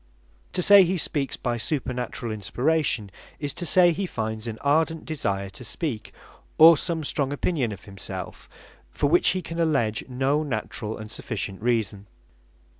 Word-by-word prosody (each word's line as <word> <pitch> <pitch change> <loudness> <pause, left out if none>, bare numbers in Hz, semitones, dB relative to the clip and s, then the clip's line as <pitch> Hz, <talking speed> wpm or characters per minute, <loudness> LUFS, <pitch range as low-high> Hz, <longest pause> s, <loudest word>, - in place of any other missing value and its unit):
To 180 - 0
say 200 +1 +9
he 185 +1 0
speaks 145 -4 -2
by 120 -2 -2
supernaturall 125 -3 -3
Inspiration, 120 - 0 0.3
is 145 -2 -3
to 175 - -3
say 175 0 +5
he 185 +4 -2
finds 110 -4 -4
an 110 -1 -4
ardent 160 +3 +1
desire 100 -11 -2
to 125 - -10
speak, 120 -2 -4 0.5
or 165 +1 +10
some 165 +1 -2
strong 140 -1 -1
opinion 145 -5 -1
of 100 -2 -9
himself, 95 -2 -8 0.4
for - - -2
which 165 +5 +4
he 185 - -4
can 165 0 -6
alledge 130 -10 +1
no 135 +4 +1
naturall 110 -5 -4
and 110 0 -8
sufficient 100 -5 -4
reason. 110 -4 -1
130 Hz, 155 wpm, -25 LUFS, 110-160 Hz, 0.5 s, or